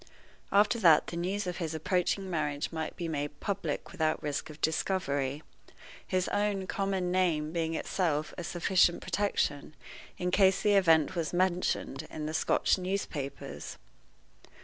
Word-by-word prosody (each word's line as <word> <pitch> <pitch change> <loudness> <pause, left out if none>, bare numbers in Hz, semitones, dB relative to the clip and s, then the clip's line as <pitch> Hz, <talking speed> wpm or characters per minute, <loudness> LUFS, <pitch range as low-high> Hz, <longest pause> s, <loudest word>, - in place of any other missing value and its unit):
After 210 +4 +4
that 165 -7 +6
the - - -6
news 185 +4 -2
of 180 -1 -3
his 160 -3 -3
approaching 185 +3 0
marriage 150 -4 -2
might 160 -1 -4
be 170 - -4
made 145 -2 -3
public 200 -1 -3
without 160 -4 0
risk 145 0 -3
of 155 0 -11
discovery, 150 -4 -1 0.6
his 185 -1 0
own 205 -2 0
common 190 -2 -1
name 165 -5 +1
being 165 -1 -1
of - - -1
itself 155 -5 -1
a 175 - -5
sufficient 175 +1 +2
protection 170 -6 -1 0.4
in 180 0 -1
case 190 0 +4
the 210 - +4
event 165 -5 +4
was 170 -1 -2
mentioned 175 -5 0
in 155 -1 -5
the 155 - -3
Scotch 160 - +2
newspapers. 180 -7 -4
175 Hz, 150 wpm, -30 LUFS, 155-190 Hz, 0.6 s, that